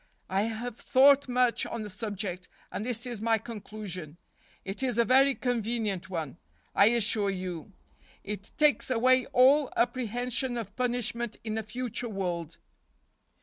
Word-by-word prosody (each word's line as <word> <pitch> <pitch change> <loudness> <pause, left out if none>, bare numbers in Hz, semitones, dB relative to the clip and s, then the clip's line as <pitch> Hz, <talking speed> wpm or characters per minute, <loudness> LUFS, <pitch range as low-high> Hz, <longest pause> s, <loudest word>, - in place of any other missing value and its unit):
I 190 +1 +2
have 230 +1 -4
thought 275 +1 +5
much 250 -1 +2
on 230 -2 -4
the 210 - -6
subject, 190 -3 -4 0.2
and - - -4
this 240 0 0
is 240 -4 -5
my 225 0 +3
conclusion. 200 -7 -7 0.5
It 195 +6 -4
is 250 -3 0
a 235 - +4
very 270 +2 +5
convenient 225 -7 -2
one, 160 -5 -4 0.4
I 200 - +6
assure 220 -3 +2
you. 185 -1 -5 0.5
It 200 -1 -6
takes 300 -3 +3
away 255 +1 +3
all 270 +3 +4
apprehension 245 +1 0
of 210 -3 -6
punishment 240 -2 -1
in 220 -1 -3
a 220 - -1
future 240 +2 -4
world." 175 -5 -3
225 Hz, 145 wpm, -29 LUFS, 200-245 Hz, 0.5 s, I